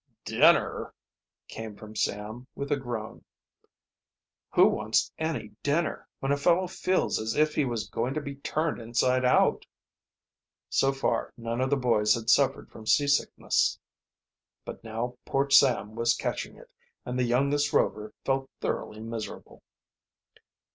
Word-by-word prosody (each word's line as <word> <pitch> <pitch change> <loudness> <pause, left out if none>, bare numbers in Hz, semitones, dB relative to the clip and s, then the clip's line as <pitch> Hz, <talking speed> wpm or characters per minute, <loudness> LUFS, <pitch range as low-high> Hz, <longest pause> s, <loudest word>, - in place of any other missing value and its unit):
"Dinner!" - - +3 0.5
came 110 -2 -7
from 110 +1 -12
Sam, 110 +6 -3
with 140 +1 -5
a - - +4
groan. 120 -5 -6 1.3
"Who - - +7
wants - - 0
any 160 -9 -2
dinner, 155 +4 -1
when 135 - 0
a 140 - +2
fellow 175 +5 +3
feels 185 +1 0
as 110 +1 -2
if 155 0 +3
he 150 - +1
was 120 -4 -3
going 125 +4 -2
to - - 0
be 140 -1 -7
turned 155 0 -2
inside 125 +3 +1
out!" 125 - +3 1.1
So 135 - +3
far 135 -4 -1
none 115 +1 -3
of 130 - +1
the 140 - +2
boys 110 -5 +3
had 115 0 0
suffered 135 -1 +2
from 110 -1 -12
seasickness, 140 +2 +2 0.9
but - - -8
now 115 +2 -4
poor 140 +1 -1
Sam 125 -6 +5
was 115 +1 +2
catching - - -4
it, - - -16 0.3
and 125 +1 -3
the - - +3
youngest 140 +4 +1
Rover 105 0 0
felt 135 0 0
thoroughly 105 - -3
miserable. 115 -1 -7
125 Hz, 140 wpm, -28 LUFS, 115-140 Hz, 1.3 s, Who